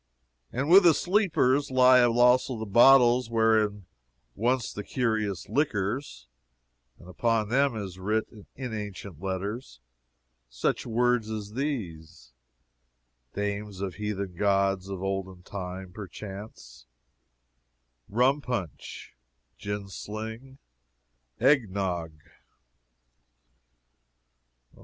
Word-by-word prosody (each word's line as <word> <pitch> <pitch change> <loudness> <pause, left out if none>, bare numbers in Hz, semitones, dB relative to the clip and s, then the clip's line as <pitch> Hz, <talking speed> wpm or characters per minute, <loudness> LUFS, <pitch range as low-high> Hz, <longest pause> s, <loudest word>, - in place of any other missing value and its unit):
And 135 +4 -2
with 185 +4 +8
the 170 -4 +5
sleepers 160 -8 +2
lie 130 -1 +6
also 120 +1 +3
the 110 - -4
bottles 120 +2 +5
wherein 110 -3 +2 0.5
were 115 - -2
once 125 -4 -4
the 105 - -6
curious 110 -7 -2
liquors: 110 - -2 0.7
and 85 - -16
upon 110 +3 0
them 135 +1 +2
is 95 -4 -6
writ, 105 +4 0 0.3
in 125 -3 -6
ancient 100 -5 -7
letters, 95 - -4 0.7
such - - -2
words 120 -1 +1
as 105 -1 -5
these 85 - -5 1.0
Dames 100 -1 -3
of 95 -2 -3
heathen 100 -1 -4
gods 95 0 +1
of 95 -1 -5
olden 95 -2 -4
time, 95 -1 -7
perchance: 95 - -10 1.2
Rumpunch, 125 - -1 0.4
Jinsling, 110 - -7 0.8
Egnog. 100 - +1
105 Hz, 90 wpm, -27 LUFS, 95-125 Hz, 1.2 s, with